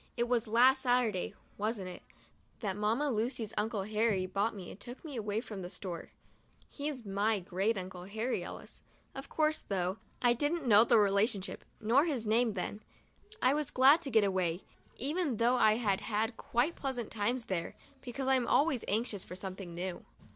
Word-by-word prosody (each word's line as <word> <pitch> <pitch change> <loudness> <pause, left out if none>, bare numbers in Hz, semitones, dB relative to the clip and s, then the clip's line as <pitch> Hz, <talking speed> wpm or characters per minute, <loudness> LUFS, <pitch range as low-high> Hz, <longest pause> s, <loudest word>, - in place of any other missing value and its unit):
It 240 0 +1
was 240 -1 +1
last 255 +4 +5
Saturday, 245 -7 +1 0.2
wasn't 210 -3 -2
it, 180 - -9 0.6
that 200 -4 -2
Mamma 225 +8 +1
Lucy's 225 -1 -1
Uncle 210 -1 -1
Harry 210 -2 +1
bought 200 +4 -1
me 185 -3 -8
and - - -12
took 245 +8 -9
me 295 -4 -6
away 215 -1 -2
from 215 -5 -7
the 175 - -6
store? 180 -3 -5 0.6
He's 285 -5 -4
my 205 +2 +1
Great 195 +4 -1
Uncle 185 -1 -6
Harry 220 +6 -2
Ellis, - - -10 0.3
of 270 0 -8
course 310 0 +1
— - - -30
though 185 0 -1 0.2
I 245 -1 +4
didn't 290 +5 -1
know 215 -2 +7
the 230 - +4
relationship, 200 0 +1 0.2
nor 240 +8 +4
his 270 -9 -1
name, 225 +1 +3
then. 205 +3 -4 0.6
I 255 - +5
was 300 -2 -1
glad 275 +6 +6
to 285 - -3
get 220 -4 +4
away, 185 -3 0 0.3
even 290 -1 0
though 240 +3 +3
I 215 -3 +5
had 210 -3 0
had 220 +1 -1
quite 250 +8 0
pleasant 255 -5 -4
times 230 +3 -1
there, 185 -6 -3 0.3
because 260 +1 -5
I'm 260 -2 +3
always 280 -5 +3
anxious 210 -2 -1
for 180 - -9
something 185 -2 -7
new. 180 +1 -4
220 Hz, 180 wpm, -32 LUFS, 200-250 Hz, 0.6 s, know